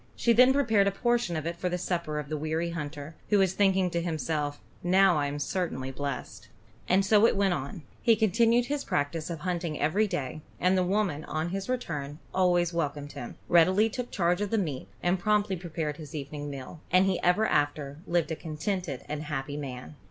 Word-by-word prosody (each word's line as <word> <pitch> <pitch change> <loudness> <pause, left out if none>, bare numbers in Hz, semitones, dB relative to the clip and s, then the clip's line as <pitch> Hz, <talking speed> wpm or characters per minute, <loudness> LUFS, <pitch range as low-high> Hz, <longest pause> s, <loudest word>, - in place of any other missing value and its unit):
She 235 - +3
then 250 +3 +7
prepared 225 -8 +3
a - - +3
portion 240 -3 0
of 155 -1 -3
it 170 +1 -2
for 180 +1 -2
the 180 - -1
supper 170 -4 -2
of 150 -2 -4
the 155 - -3
weary 160 +3 -2
hunter, 150 -1 -6 0.2
who 210 - +4
was 190 -2 +3
thinking 190 -2 +2
to 170 0 0
himself, 155 -3 -2 0.2
"Now 190 +1 +4
I 145 -1 +1
am 145 +1 -4
certainly 145 -4 -2
blessed." 140 +1 -5 0.4
And 190 +2 +4
so 210 +2 +6
it - - +1
went 195 -2 +2
on. 140 +1 -5 0.2
He 230 - +5
continued 230 +3 +3
his 285 +2 -2
practise 155 +3 -1
of 165 -3 -5
hunting 170 -3 -2
every 205 +8 +2
day, 155 -6 -4 0.2
and 180 +1 +3
the 185 - +3
woman, 180 -5 0
on 155 +2 -2
his 195 +4 -4
return, 150 - -3 0.2
always 175 -2 +2
welcomed 145 -3 -2
him, 120 - -7
readily 185 +6 +5
took 245 +2 -4
charge 175 0 +1
of 205 - -1
the 225 - +1
meat, 155 -10 -2 0.2
and 180 +1 +2
promptly 210 0 +2
prepared 160 -4 -4
his 155 -2 -9
evening 145 0 -5
meal; 140 +3 -8
and 185 +2 +5
he 190 -2 0
ever 180 +5 +3
after 145 -3 0
lived 170 -2 +1
a - - 0
contented 160 -1 -4
and 150 0 -4
happy 145 -1 -3
man. 135 0 -7
170 Hz, 205 wpm, -28 LUFS, 150-195 Hz, 0.4 s, then